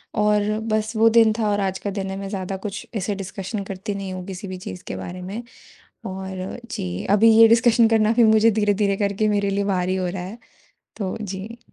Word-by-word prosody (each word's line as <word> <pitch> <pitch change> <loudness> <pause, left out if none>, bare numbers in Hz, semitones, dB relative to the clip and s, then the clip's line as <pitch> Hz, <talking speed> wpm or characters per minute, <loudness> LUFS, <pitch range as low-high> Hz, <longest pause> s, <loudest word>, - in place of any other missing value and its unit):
और 210 -1 +3 0.2
बस, 220 0 -1
वो 225 +1 +5
दिन 225 -1 +5
था 215 -2 +1
और 205 - +1
आज 190 -1 -1
का 205 - -4
दिन 195 -1 -4
है 190 - -4
मैं 195 0 -5
ज़्यादा 195 -1 -4
कुछ 205 -1 -5
ऐसे 205 0 -1
डिस्कशन 195 +1 -5
करती 195 +2 -5
नहीं 195 -1 -5
हूँ 185 -1 -6
किसी 195 +1 -7
भी 185 0 -6
चीज़ 95 - -8
के - - -4
बारे 175 - -7
में 195 +6 -5 0.6
और 190 +2 -6
जी, 90 0 -4
अभी 215 +3 +6
ये 225 - +9
डिस्कशन 230 0 +5
करना 220 -1 +3
भी 235 0 +4
मुझे 220 0 +5
धीरे-धीरे 205 -1 +1
करके 200 +1 0
मेरे 205 -1 +1
लिए 200 +1 0
भारी 185 -2 0
हो 185 -1 -1
रहा 180 0 -5
है, 195 +6 -8 0.6
तो 195 -4 -3
जी। 205 +3 -6
200 Hz, 215 wpm, -22 LUFS, 190-215 Hz, 0.6 s, ये